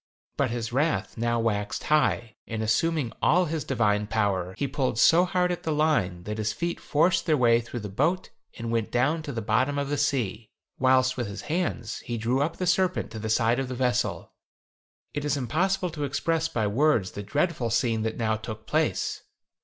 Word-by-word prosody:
But - - +1
his 115 -1 -4
wrath 130 -9 0
now 120 0 0
waxed 105 -3 -1
high, 120 -7 +1
and 110 -1 -3
assuming 140 +3 +1
all 180 +3 +4
his 160 -1 -2
divine 105 -5 +1
power, 100 -4 0
he 140 - -1
pulled 135 -4 -1
so 170 +9 +6
hard 180 0 +1
at 175 - -3
the 160 - -2
line 145 - +1
that 105 +2 -5
his 110 -1 -1
feet 170 +10 -3
forced 165 +5 +2
their 155 -2 +4
way 120 -2 +4
through 120 0 -6
the - - -7
boat 155 - 0 0.3
and 115 -1 -4
went 115 -2 -1
down 150 +7 +1
to 150 - -6
the 115 -4 -4
bottom 130 +7 +1
of 140 -1 -1
the 145 -1 -1
sea, 120 -7 -1 0.3
whilst 130 0 +3
with 120 -3 -2
his 100 0 -6
hands 155 -9 -2
he 120 -1 -4
drew 120 +5 0
up 160 +3 -1
the 185 - -2
serpent 180 -3 +1
to 110 - -6
the 110 +1 -4
side 115 +3 +2
of 135 - -2
the 130 - -5
vessel. 125 -1 -1 0.8
It 145 - -3
is 145 0 0
impossible 180 +7 0
to 150 -2 -4
express 160 +3 0
by 115 -8 -1
words 115 -2 +2
the 100 - -6
dreadful 145 - -1
scene 115 -1 +1
that 110 0 -2
now 110 -1 0
took 110 0 -8
place. - - 0
125 Hz, 200 wpm, -26 LUFS, 110-150 Hz, 0.8 s, so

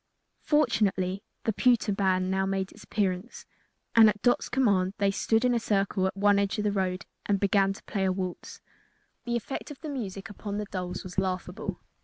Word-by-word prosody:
Fortunately, 195 - +1 0.2
the 225 - 0
pewter 235 -1 +3
band 185 -1 +1
now 190 0 +1
made 195 -1 -1
its - - -14
appearance, 195 +1 -2 0.5
and 225 -2 +9
at 210 0 -2
Dot's 245 - +2
command 200 -7 +2
they 200 -1 +2
stood 225 +4 +1
in 250 - +3
a 235 - +2
circle 195 -3 +1
at 190 - -5
one 205 0 +4
edge 200 +1 0
of 210 - -1
the 210 - +1
road 190 -1 -1 0.2
and 200 -1 +2
began 195 0 +3
to 195 - -9
play 195 -2 -1
a 190 - +2
waltz. 185 -1 -5 0.6
The 240 -1 -1
effect 235 +3 -4
of 295 - -9
the 315 - -5
music 200 -8 -5
upon 205 0 -6
the 210 - -2
dolls 180 -2 -5
was 185 0 -3
laughable. 185 -1 -3
200 Hz, 195 wpm, -28 LUFS, 190-215 Hz, 0.6 s, and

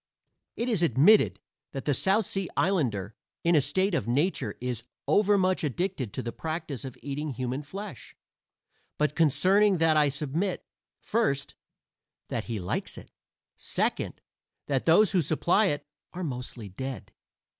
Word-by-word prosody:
It 235 - -2
is 220 -8 +2
admitted 165 - +5 0.3
that 135 - -5
the 145 - +2
South 195 - +2
Sea 195 -2 -2
islander 115 - +1 0.3
in 170 0 +4
a 150 - +6
state 185 +8 +1
of 165 - 0
nature 130 - 0
is 125 -2 -3 0.2
overmuch 195 -3 +3
addicted 150 - -2
to - - -3
the 120 - -3
practice 155 -4 -4
of 130 -3 -7
eating 145 +2 -3
human 130 +3 -3
flesh; 185 - -8 0.8
but 150 -1 +1
concerning 190 +6 +4
that 160 -1 +3
I 150 -1 +4
submit: 150 +7 -2 0.4
first, 175 -12 0 0.8
that - - -3
he 115 -3 -3
likes 90 - -3
it; - - -12 0.5
second, - - -2 0.4
that 135 -3 -1
those 185 +5 +6
who 185 -3 +3
supply 170 +7 +2
it 145 -5 -1 0.3
are 180 - -5
mostly 125 -6 -5
dead. 125 +3 -6
150 Hz, 145 wpm, -28 LUFS, 130-185 Hz, 0.8 s, a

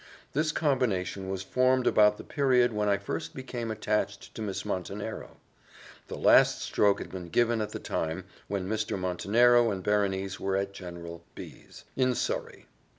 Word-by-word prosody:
This 155 +2 +1
combination 110 - 0
was 95 0 -3
formed 130 +4 +2
about 105 0 +5
the - - -9
period 125 -4 +2
when 105 -1 0
I 100 - +3
first 80 -4 -5
became 125 -3 -5
attached 105 -2 -2
to - - -7
Miss 100 -3 -4
Montenero: 100 +4 -5 0.7
the - - -6
last - - +5
stroke 100 -1 +2
had - - -8
been 90 -2 -7
given 120 +3 +2
at 105 - -2
the - - -5
time 80 0 -3 0.2
when 95 -2 -3
Mr. 105 0 -1
Montenero 115 +7 +3
and 95 -3 -3
Berenice 100 -2 0
were 95 0 0
at 100 0 -2
General 85 -2 -8
B - - -10
's, - - -13
in 130 -1 +2
Surrey. - - -3
105 Hz, 165 wpm, -28 LUFS, 95-120 Hz, 0.7 s, about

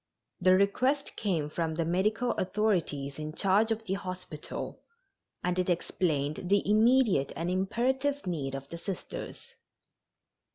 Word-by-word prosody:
The 185 +1 +5
request 255 +9 +1
came 175 -9 0
from 160 +1 -2
the 165 0 0
medical 210 +8 +1
authorities 180 -10 0
in 155 0 -4
charge 205 +3 +3
of 225 0 -1
the 190 - -1
hospital, 185 -5 -6 0.6
and 180 0 0
it 180 - +1
explained 160 -2 0
the 200 -1 +3
immediate 215 - +4
and 165 +4 -2
imperative 265 +9 0
need 145 -7 -2
of 135 0 -6
the 170 - -7
Sisters. 190 0 -6
185 Hz, 130 wpm, -30 LUFS, 160-215 Hz, 0.6 s, The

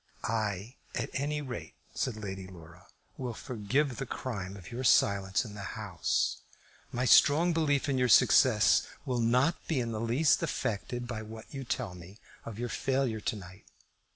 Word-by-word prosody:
"I, 110 +1 -2 0.2
at - - -3
any 150 +2 -1
rate," 130 -3 -7 0.2
said 125 -4 -2
Lady 95 -3 -6
Laura, 85 0 -14 0.3
"will 125 -3 -4
forgive 125 +4 -1
the 135 - -4
crime 100 -8 -5
of 90 +1 -11
your 125 +2 -4
silence 100 -3 +3
in 105 - -9
the 100 -3 -7
House. - - 0 0.5
My 125 +1 -1
strong 160 +7 +6
belief 150 -3 +1
in 135 -2 +1
your 125 -1 +2
success - - +5 0.2
will 125 -2 -1
not 125 +8 +2
be 155 -5 0
in 120 -2 -2
the 110 -1 -3
least 125 +7 +3
affected 120 +3 -2
by 120 -3 -5
what 110 +3 -10
you 135 -1 -5
tell 120 -5 -3
me 90 +3 -12 0.3
of 110 -2 -7
your 120 +1 -2
failure 130 -5 -1
to 110 - -1
night. 95 0 -11
115 Hz, 170 wpm, -30 LUFS, 100-130 Hz, 0.5 s, strong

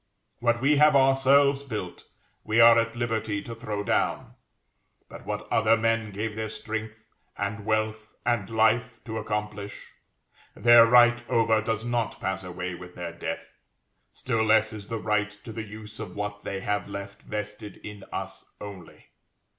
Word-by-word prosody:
What 120 0 +1
we 145 +2 +4
have 150 0 +6
ourselves 135 +1 +4
built, 105 -10 -6 0.4
we 110 +2 +1
are 115 0 +8
at 115 0 -1
liberty 110 -4 -2
to 115 - -7
throw 110 -3 -4
down; - - 0 0.7
but - - -12
what - - -4
other 115 0 +4
men 115 -1 +1
gave 105 +2 -4
their 110 0 -3
strength, 110 0 -5 0.4
and 100 +1 -4
wealth, 110 0 0 0.2
and 120 -5 0
life 115 +2 +1
to 110 -1 -4
accomplish, 105 -1 -5 0.7
their 120 +1 +7
right 120 0 +6
over 110 -1 +3
does 110 +1 -2
not 120 -1 -1
pass 95 0 -3
away 90 0 -5
with 90 0 -10
their 85 -1 -6
death; 85 - -6 0.6
still 115 -3 -1
less 110 0 +3
is 105 -2 -8
the 115 - -3
right 105 -1 0
to 115 - -8
the 110 0 -5
use 105 0 -10
of 105 -5 -7
what 105 0 -4
they 95 -1 -4
have 105 +1 -1
left 100 0 -7
vested 105 -1 -6
in 105 -2 -9
us - - -5 0.2
only. 100 -4 -11
110 Hz, 160 wpm, -26 LUFS, 105-115 Hz, 0.7 s, are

